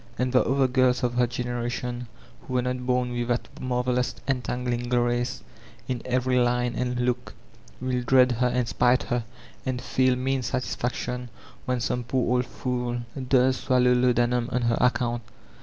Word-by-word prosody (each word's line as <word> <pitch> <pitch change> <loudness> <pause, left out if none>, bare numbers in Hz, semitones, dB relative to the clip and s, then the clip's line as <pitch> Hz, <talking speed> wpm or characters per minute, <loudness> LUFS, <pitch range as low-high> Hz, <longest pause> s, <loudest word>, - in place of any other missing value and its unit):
And 125 0 0
the 125 - +5
other 135 +1 +2
girls 130 0 +2
of 120 -1 +1
her 125 0 +2
generation, 120 0 -3 0.3
who 130 - -6
were 125 - +2
not 125 0 -3
bom 125 -1 +1
with 120 -1 -2
that 120 0 -1
marvelous 125 0 0
entangling 125 -2 -1
grace 120 +1 0 0.4
in 125 -3 -2
every 125 0 +1
line 120 0 +1
and 125 -1 -1
look, 125 0 -1 0.4
will 130 -1 -1
dread 125 +1 +5
her 125 +1 +1
and 125 -1 0
spite 125 +2 +3
her, 120 -1 -2 0.4
and 130 -2 -2
feel 130 0 +2
mean 130 +1 0
satisfaction 125 0 -3 0.4
when 125 -2 -1
some 125 +1 -1
poor 125 0 +1
fool 125 -1 -3 0.3
does 130 0 +4
swallow 125 -2 +3
laudanum 125 -1 +2
on 125 - 0
her 115 -1 +2
account. 120 -1 +1
125 Hz, 155 wpm, -26 LUFS, 120-125 Hz, 0.4 s, the